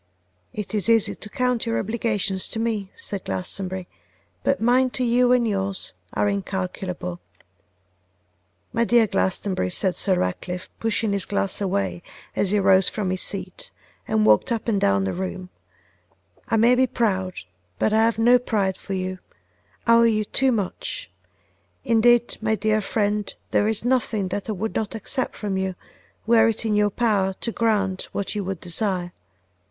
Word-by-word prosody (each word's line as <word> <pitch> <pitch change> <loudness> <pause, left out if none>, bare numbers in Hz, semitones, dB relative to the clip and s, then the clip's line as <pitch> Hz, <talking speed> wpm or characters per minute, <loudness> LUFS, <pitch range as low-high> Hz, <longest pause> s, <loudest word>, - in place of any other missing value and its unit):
'It 210 0 -5
is 210 +1 +2
easy 225 -2 +4
to 210 - -11
count 250 0 0
your 230 - 0
obligations 210 -3 -1
to - - -3
me,' 220 -4 -1
said 200 -2 -4
Glastonbury, 180 - -4 0.6
'but 275 - +1
mine 250 +3 +3
to 255 - -2
you 245 +1 +3
and 245 -2 +4
yours 195 -2 -2 0.2
are - - +1
incalculable.' 185 -2 -3 1.5
'My 230 0 +2
dear 235 -1 +4
Glastonbury,' 190 - 0
said 185 - 0
Sir 190 - +1
Ratcliffe, 180 - -3
pushing 225 -1 0
his 200 -3 +2
glass 200 0 -1
away 95 - -1 0.3
as 195 - +1
he 210 - +2
rose 190 -1 +5
from 200 -4 -2
his 185 - -2
seat 185 -2 -3 0.4
and 110 -1 +2
walked 105 - +4
up 230 0 -2
and 205 -4 +1
down 100 0 +3
the 95 - -1
room, 185 0 -5 1.0
'I 225 - +2
may 235 +3 +5
be 255 +1 +3
proud, 190 -6 -1 0.4
but 215 - +1
I 220 +1 +4
have 230 -1 +2
no 240 +2 +5
pride 200 -6 0
for 195 - -6
you, 185 0 -3 0.7
I 230 - +5
owe 230 - +7
you 220 -2 +3
too 265 +5 +1
much; 230 - -3 0.7
indeed, 240 -1 +3
my 220 0 +1
dear 215 +1 +1
friend, 210 0 -1 0.2
there 205 - +3
is 220 +1 -1
nothing 225 -6 +1
that 200 +3 -4
I - - 0
would 215 +3 -3
not 220 0 -2
accept 250 +4 -2
from 200 -3 -3
you, 190 -1 -2 0.5
were 225 0 +5
it 225 0 -1
in 220 - +1
your 210 0 +3
power 205 -3 +1
to 230 - 0
grant 205 -5 0
what 200 - -2
you 210 -1 -2
would 190 -2 -4
desire. 180 -1 -2
205 Hz, 170 wpm, -23 LUFS, 190-230 Hz, 1.5 s, owe